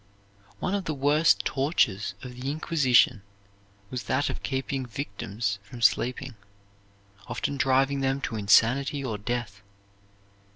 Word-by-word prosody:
One 185 - -2
of 200 -3 -1
the 155 - -2
worst 145 +4 +3
tortures 135 - 0
of 125 -1 -7
the 125 +2 -5
Inquisition 135 -7 +3 0.7
was 125 -1 -4
that 135 +2 0
of - - -7
keeping 135 0 -2
victims 105 -4 -4
from 115 +4 -9
sleeping, 125 +4 +1 0.9
often 120 +4 -3
driving 135 +1 +2
them 135 0 0
to 115 - -3
insanity 125 +7 +3
or 110 -5 -3
death. 105 -2 -4
130 Hz, 125 wpm, -27 LUFS, 115-140 Hz, 0.9 s, worst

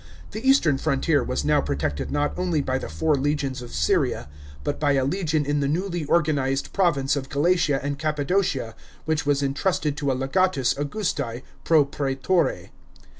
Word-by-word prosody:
The 215 - -5
east 270 -6 +4
rn 140 -4 +2
frontier 140 +1 +1
was 70 +3 -2
now - - +3
protected 70 +1 -2
not 145 0 0
only 180 -4 0
by 130 -2 -1
the - - -6
four 160 -1 0
legions 140 -2 -1
of 120 - -9
Syria, 75 -3 0 0.4
but - - -2
by 145 -2 +2
a 135 -1 +2
legion 155 -1 0
in 145 +1 0
the 140 - 0
newly 175 0 -2
organised 140 -5 +1
province 150 -8 +2
of 135 -2 -4
Galatia 150 -1 +2
and 140 0 -3
Cappadocia 150 - 0 0.3
which 155 -2 -1
was 145 -1 +2
entrusted 145 +1 0
to 140 -3 0
a - - 0
legatus 135 -1 +1
August! 145 +4 -2 0.4
pro 155 -3 +4
praetore. 140 +4 -1
145 Hz, 170 wpm, -24 LUFS, 135-160 Hz, 0.4 s, east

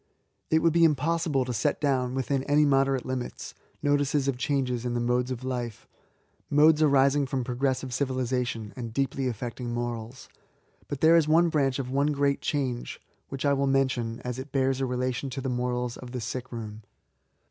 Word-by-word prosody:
It 160 0 +3
would 165 -2 +4
be 170 0 +4
impossible 150 -2 +2
to 125 - -3
set 140 +6 0
down, 130 -4 0
within 135 +1 -1
any 150 +1 +4
moderate 135 -2 +2
limits, 130 -1 -5 0.3
notices 145 -1 +1
of 135 - +1
changes 125 -2 -1
in 120 -1 -2
the - - 0
Modes 125 +1 +1
of 130 -1 -5
life, 120 -4 -4 0.3
— - - -41
modes 155 0 +6
arising 140 -1 +4
from 130 -2 -2
progressive 130 +1 -1
civilisa 130 -1 -1
tion, 110 -3 -6
and 115 -3 -6
de^ly 135 -1 0
affecting 120 +1 -5
morals; 120 +1 -5 0.3
— - - -35
^but 140 -2 -4
there 160 +1 +6
is 160 -3 +3
one 165 +2 +4
branch 140 -4 +1
of 130 -2 -4
one 140 +2 +2
great 140 -1 +1
change, 130 -5 -2 0.3
which 135 +1 -4
I 140 - +4
will 140 0 +1
mention, 130 -4 0
as 125 0 -4
it 130 +1 -8
bears 135 -1 +1
a 135 - 0
relation 125 +1 -2
to 135 +1 -5
the 130 0 -3
morals 125 -1 -2
of 125 -1 -10
the 125 - -3
sick 125 +2 -5
room. 110 -2 -7
130 Hz, 190 wpm, -27 LUFS, 125-140 Hz, 0.3 s, modes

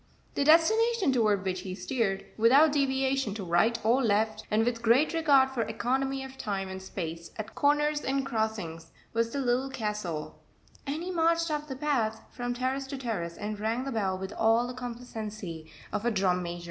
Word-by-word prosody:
The - - +1
destination 380 - +4
toward 210 -5 +2
which 185 -1 -1
he 185 0 -6
steered, 205 -4 -1
without 270 +8 +6
deviation 270 -5 +1
to 210 - -5
right 175 +7 +3
or 240 +4 +4
left, 215 0 +1
and 220 +1 +2
with 235 -1 -1
great 240 +8 +4
regard 280 -5 +4
for 255 -3 -1
economy 265 +5 -1
of 265 0 -10
time 195 -2 -3
and 190 0 -6
space 170 -3 -6
at 215 -1 -6
corners 295 +1 +2
and 270 0 -1
crossings, 220 -9 -3 0.2
was 230 0 +1
the 280 - -5
Little 255 +1 +1
Castle, 210 -11 -4 0.5
and 300 +4 -2
he 365 - -3
marched 335 -1 +2
up 300 0 -2
the 265 - -5
path 250 -6 0
from 245 0 -3
terrace 260 +2 -2
to 275 - -5
terrace, 200 -10 -3
and 210 0 -4
rang 225 +4 -1
the 275 - -4
bell 195 -5 0
with 190 +1 -6
all 225 +2 +3
the 250 - -5
complacency 215 -9 -7 0.2
of 205 - -1
a 240 - +2
drum 190 -4 +1
major. 175 0 -5
235 Hz, 185 wpm, -29 LUFS, 205-270 Hz, 0.5 s, without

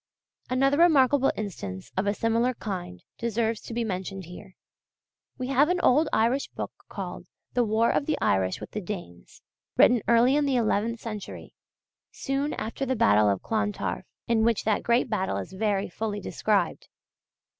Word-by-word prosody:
Another 270 +3 +2
remarkable 285 -5 +5
instance 100 - -6
of 190 +2 0
a 205 - +1
similar 230 +3 +1
kind 180 - -6 0.2
deserves 230 -1 -1
to - - -10
be 235 +1 -1
mentioned 190 -2 -4
here. 180 +2 -12 0.8
We 255 - -3
have 275 +3 +4
an 360 0 +1
old 295 +5 +4
Irish 240 +5 +2
book - - -6 0.2
called - - -6 0.3
"The 245 - +3
War 225 +1 +2
of 285 - 0
the 310 - +1
Irish 95 -1 +1
with - - -9
the 215 - -4
Danes," 175 - -8 0.3
written 240 -2 +6
early 235 +3 +5
in 295 -1 +2
the 270 - +1
eleventh 230 0 +1
century, 215 -4 -7 0.6
soon 275 +2 -2
after 225 +5 -4
the 260 -1 0
battle 105 - +4
of 100 -2 -1
Clontarf, 215 -2 -2 0.2
in 230 -2 +2
which 230 -2 +2
that 215 -1 +1
great 240 +2 +2
battle 190 -5 -1
is - - -6
very 200 0 0
fully 205 +3 -4
described. - - -1
225 Hz, 165 wpm, -26 LUFS, 200-255 Hz, 0.8 s, written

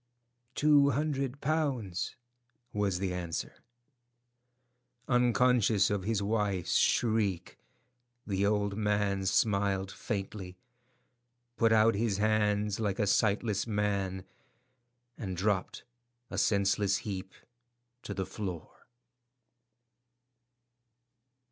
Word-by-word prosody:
"Two 145 -1 +5
hundred 140 -1 -2
pounds," 130 - -1 0.6
was 100 -3 0
the 95 0 -2
answer. 85 -2 -4 1.5
Unconscious 125 -4 +3
of 100 -2 -2
his 110 -2 0
wife's 100 -4 0
shriek, 110 -6 +1 0.7
the 100 -1 -1
old 100 -1 +1
man 105 -2 0
smiled 100 -1 +1
faintly, 100 -4 -5 1.0
put 115 -1 +3
out 110 +1 +5
his 105 -1 0
hands 105 -1 +1
like 100 -3 -1
a 105 - +1
sightless 100 +1 +1
man, 100 -3 -1 1.0
and 95 -4 -4
dropped, 95 0 -1 0.5
a - - -4
senseless 100 0 +2
heap, 95 -2 -5 0.7
to - - -6
the 95 - -2
floor. 90 -7 -7
105 Hz, 90 wpm, -30 LUFS, 95-110 Hz, 1.5 s, Two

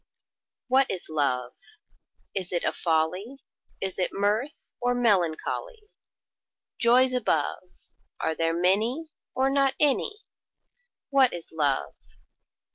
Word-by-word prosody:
WHAT 265 +1 +4
is 180 -4 -4
Love? 125 -5 0 0.8
Is 185 -2 -3
it 175 -2 0
a - - +1
folly, 180 +10 -1 0.4
Is 190 -1 -3
it 180 - +1
mirth, 210 +8 -2
or 245 0 +1
melancholy? 245 - 0 0.9
Joys 255 +2 +5
above, 180 - -1 0.5
Are 160 - 0
there 165 +1 0
many, 225 - +1 0.3
or 265 +1 +2
not 275 -1 +2
any? 300 - +1 0.9
What 270 -3 +5
is 170 -1 -8
Love? 140 - 0
205 Hz, 110 wpm, -26 LUFS, 165-265 Hz, 0.9 s, Joys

